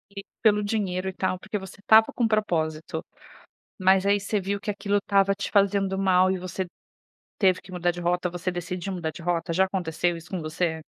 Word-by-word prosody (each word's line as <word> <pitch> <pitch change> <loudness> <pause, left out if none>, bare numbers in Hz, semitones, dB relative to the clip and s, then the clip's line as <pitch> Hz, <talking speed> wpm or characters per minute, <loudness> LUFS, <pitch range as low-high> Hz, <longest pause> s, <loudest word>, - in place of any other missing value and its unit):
E 200 - -5 0.2
pelo 210 -2 +4
dinheiro 190 -3 -1
e - - -7
tal 185 -1 -1
porque 215 +2 -4
você 190 -1 -10
estava 220 +2 +6
com 245 - 0
um - - +3
propósito. 160 -7 -1 0.8
Mas 190 0 +4
aí 200 0 +3
você 200 +1 -1
viu 200 +1 -2
que 210 - -3
aquilo 205 0 -1
estava 195 -1 +2
te 200 - -5
fazendo 195 -1 +2
mal 185 -1 +4
e 190 - 0
você 185 +1 -4 0.7
teve 185 -3 +3
que 185 - -14
mudar 175 -1 0
de 175 0 -7
rota 180 +1 0
você 175 +1 -3
decidiu 180 +2 -4
mudar 170 -3 -3
de 170 - -11
rota, 170 0 -1
já 190 +3 +4
aconteceu 175 -2 -1
isso 165 +1 -13
com 185 - -3
você? 160 +1 -2
185 Hz, 210 wpm, -26 LUFS, 175-200 Hz, 0.8 s, estava